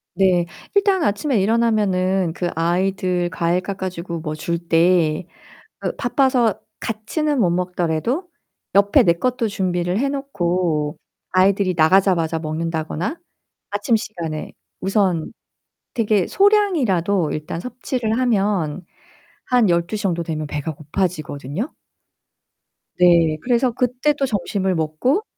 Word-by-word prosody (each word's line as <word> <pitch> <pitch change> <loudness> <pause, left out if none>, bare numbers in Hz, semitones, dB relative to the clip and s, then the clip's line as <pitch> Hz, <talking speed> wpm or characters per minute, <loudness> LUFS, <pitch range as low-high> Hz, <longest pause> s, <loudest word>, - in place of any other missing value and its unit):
네. 180 -2 +3 0.3
일단 395 -3 +3
아침에 220 +2 +1
일어나면은 195 -5 +1
그 175 -1 -2
아이들 180 0 0
과일 170 +2 0
깎아 190 -1 -4
주고 170 -1 -6
뭐 155 -1 -4
줄 170 +2 -2
때 170 -1 +2 0.6
으 - - -1
바빠서 255 -6 +2 0.2
같이는 275 +7 -2
못 180 -5 +3
먹더라도 180 - -1 0.5
옆에 200 0 +5
내 170 - +4
것도 240 +5 -1
준비를 180 -1 -1
해 275 +1 +1
놓고 175 - -1 0.3
아이들이 185 0 +3
나가자마자 165 -1 +3
먹는다거나 160 - -3 0.5
아침 205 +3 +1
시간에 170 -8 -4 0.3
우선 190 -5 +1 0.6
되게 215 -6 +2
소량이라도 255 - +2
일단 155 +2 -4
섭취를 245 -1 -2
하면 195 -8 0 0.6
한 245 -6 +3
12:00 175 +5 0
정도 170 -3 0
되면 155 -2 -4
배가 150 +2 -4
고파지거든요. 155 - -3 1.3
네, 170 -3 +5
그래서 245 0 +2
그때 250 +5 +1
또 275 -1 -1
점심을 190 -4 -1
먹고 160 - 0
185 Hz, 255 characters per minute, -21 LUFS, 170-225 Hz, 1.3 s, 옆에